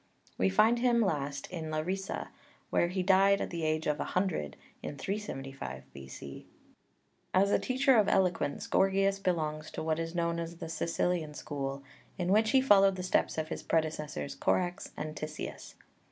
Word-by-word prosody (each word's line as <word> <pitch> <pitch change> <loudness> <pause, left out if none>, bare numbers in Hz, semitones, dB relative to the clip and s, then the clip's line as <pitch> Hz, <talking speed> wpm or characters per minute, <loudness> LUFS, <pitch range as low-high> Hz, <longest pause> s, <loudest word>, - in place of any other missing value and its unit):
We 95 - +2
find 225 - +4
him 240 -1 +3
last 145 -9 -1
in 165 -3 -4
Larissa, 185 +5 -3 0.4
where 175 - +3
he 185 +1 -1
died 195 +1 +5
at - - -3
the 170 -1 -3
age 155 0 0
of 150 0 0
a - - 0
hundred 180 - -1 0.2
in 145 - -6
375 135 - -5
B.C. 70 0 -9 0.9
As 200 +2 +4
a - - +4
teacher 260 +1 +3
of 210 -2 +4
eloquence 180 -6 +1
Gorgias 195 +1 +2
belongs 155 -5 -1
to - - -5
what 160 0 0
is 165 +1 -4
known 170 -1 0
as 170 0 -5
the 165 - -6
Sicilian 165 -1 -1
school, 140 -2 -4 0.3
in 180 0 0
which 220 +2 +4
he 265 +2 +5
followed 195 -6 +6
the 185 - -5
steps 180 - +1
of 155 0 -2
his - - -4
predecessors, 155 -3 -1
Korax 180 +1 0
and 155 0 -4
Tisias. 155 0 -6
170 Hz, 170 wpm, -31 LUFS, 155-195 Hz, 0.9 s, followed